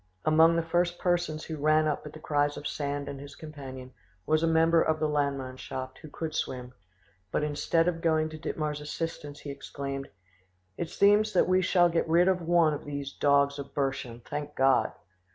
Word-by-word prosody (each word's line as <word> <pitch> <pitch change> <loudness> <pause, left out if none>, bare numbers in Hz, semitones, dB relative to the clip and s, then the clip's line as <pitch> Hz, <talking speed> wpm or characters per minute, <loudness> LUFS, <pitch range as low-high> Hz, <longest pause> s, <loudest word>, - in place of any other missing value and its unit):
Among 160 +2 +5
the 170 - +1
first 175 +1 0
persons 175 -3 0
who 160 - -5
ran 155 +1 +3
up 150 0 -2
at 150 - -10
the 155 - -10
cries 145 -1 0
of 145 - -8
Sand 145 -1 -3
and 140 - -6
his 140 0 -10
companion 135 -4 -9 0.3
was 155 0 +2
a 165 - +2
member 165 0 +4
of 160 0 +1
the 155 - +1
Landmannschaft 130 -3 -3
who 155 - -11
could 160 +1 -5
swim, 125 -1 -4 0.6
but - - 0
instead 160 +3 +1
of 165 -2 -1
going 160 -2 +2
to 155 0 -9
Dittmar's 150 -1 -3
assistance 150 -1 -5
he 145 - -6
exclaimed, 140 0 -6 0.7
"It 165 - -4
seems 210 +1 +4
that 180 - +4
we 185 0 +3
shall 175 -1 +4
get 165 -1 0
rid 175 +2 +5
of 185 -1 +2
one 170 -2 +3
of 145 - -5
these 140 -1 -5
dogs 140 0 +2
of 140 - -8
Burschen; 135 -4 -2
thank 145 +3 -6
God!" 135 0 +3
150 Hz, 190 wpm, -28 LUFS, 140-165 Hz, 0.7 s, Among